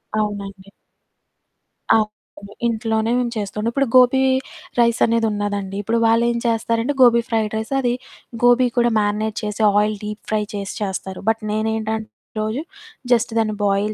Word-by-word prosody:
అవునండి. 200 -2 -3 1.3
అవును. 215 -1 +2 0.6
ఇంట్లోనే 225 0 0
మేము 240 -1 -1
చేస్తుంటాం. 210 +2 -2
ఇప్పుడు 275 +1 +1
గోబీ 255 +1 +6 0.6
రైసనేది 230 -1 +3
ఉన్నదండి. 205 -1 -3
ఇప్పుడు 230 +3 0
వాళ్ళేం 235 +1 +2
చేస్తారంటే, 230 +3 0
గోబీ 235 -1 +6
ఫ్రైడ్ 220 -2 0
రైసది, 245 +2 0 0.5
గోబీ 245 +1 +5
కూడా 240 0 +4
మ్యారినేట్ 210 +1 -1
చేసి, 210 +1 -3 0.2
ఆయిల్ 210 0 +1
డీప్ 210 +1 -6
ఫ్రై 215 -1 +1
చేసి 200 -1 -4
చేస్తారు. 190 -1 -4
బట్ 225 0 0
నేనేంటంటే 220 0 -2 0.3
రోజూ 215 +6 -2 0.5
జస్ట్ 230 -1 +3
దాన్ని 215 -1 +1
బాయిల్ 200 +2 +1
220 Hz, 130 wpm, -20 LUFS, 210-235 Hz, 1.3 s, గోబీ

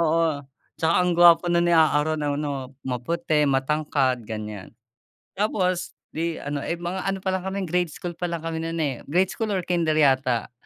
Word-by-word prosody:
Oo, 160 -2 +1 0.3
tsaka 160 +1 +1
ang 180 -1 +1
gwapo 175 0 +7
no'n 170 0 +3
ni - - +3
A-a-ron, 155 -1 +3
ano 145 -2 -3
maputi, 150 +4 0
matangkad 135 -1 +1
ganyan. 105 -2 -6 0.6
Tapos 185 -3 -1 0.2
'di 165 0 -2
ano, 145 0 -3
eh, 170 - -2
mga 175 +2 -4
ano 195 0 -1
pa 190 - 0
lang 185 -1 -2
kami 195 0 -2
grade 180 0 0
school 175 +3 -6
pa 175 - -2
lang 170 -1 -4
kami 165 -1 -3
no'n, 165 0 -3
eh, 135 -4 -2
grade 180 +5 +2
school 225 - -3
or 185 -2 -1
kinder 170 -3 +1
yata. 130 -5 +2
160 Hz, 180 wpm, -24 LUFS, 145-175 Hz, 0.6 s, gwapo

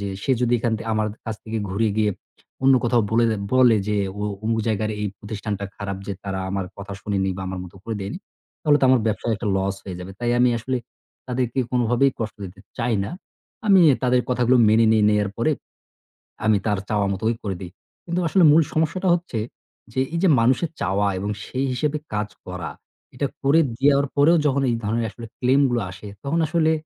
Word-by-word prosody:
যে, 100 - -3
সে - - -1
যদি 120 -1 +1
এখান 115 0 0
থেকে 115 +1 -7
আমার 110 0 +1
দ - - -13
কাছ 110 - -2
থেকে 110 0 -3
ঘুরে 110 +4 +1
গিয়ে 105 -1 +2 0.5
অন্য 135 0 +6
কোথাও 120 -1 +3
বলে 115 +1 +3
দ - - +2 0.2
বলে 125 -3 +6
যে, 105 - +1 0.2
"ওয়া 105 0 -2 0.2
অমুক 115 0 +1
জায়গার 110 -1 0
এই 105 - 0
প্রতিষ্ঠানটা 105 -1 -4
খারাপ 100 -1 -4
যে 100 - -2
তারা 95 -1 -3
আমার 95 0 -1
কথা 100 0 -7
শুনেনি 100 -3 -1
বা 95 - -5
আমার 95 - -4
মতো 90 +1 -13
করে 115 - -3
দেয়নি।" 100 - -5 0.4
তাহলে 150 -2 +4
তো - - +3
আমার 130 -1 +5
ব্যবসায় 110 +2 0
একটা 105 -1 -3
লস 95 0 0
হয়ে 95 -2 -6
যাবে 95 +2 -8
তাই 120 0 0
আমি 125 0 +5
আসলে 130 +3 -2 0.5
তাদেরকে 125 0 -2
কোনোভাবেই 125 +2 +3
কষ্ট 110 -2 -3
দিতে 95 +1 -10 0.2
চাই 115 -1 +1
না - - -5 0.6
আমি 195 -3 +7
এ - - +3
তাদের 125 0 +3
কথাগুলো 125 0 +3
মেনে 110 +1 +5
নিয়ে 110 -1 +4
নেয়ার 105 -1 +2
পরে 120 +7 +2 0.9
আমি 110 -1 +4
তার 105 -2 +1
চাওয়া 105 -2 +1
মতোই 110 +4 0
করে 95 -3 -2
দেই। 90 - -7 0.3
কিন্তু 170 +1 -1
আসলে 180 +2 +3
মূল 160 +2 +6
সমস্যাটা 165 +4 0
হচ্ছে 170 -9 -2 0.5
যে, 130 - -1
এই 170 - 0
যে - - +5
মানুষের 130 +8 +2
চাওয়া 100 +1 +1
এবং 100 +2 -3 0.2
সেই 130 +1 -2
হিসেবে 145 +4 -1 0.2
কাজ 105 0 -1 0.2
করা 90 -1 -5 0.5
এটা 140 +2 0 0.2
করে 140 +4 +5 0.2
দিয়ার 140 +1 +4
পরেও 150 +4 +5
যখন 140 -1 +2
এই 120 - +1
ধরনের 115 +2 0
আসলে 115 +3 -10
ক্লেইম 130 +3 +3
গুলো 120 -1 0
আসে 90 +3 -10 0.2
তখন 155 +4 0
আসলে 160 0 +2
115 Hz, 205 wpm, -23 LUFS, 105-130 Hz, 0.9 s, আমি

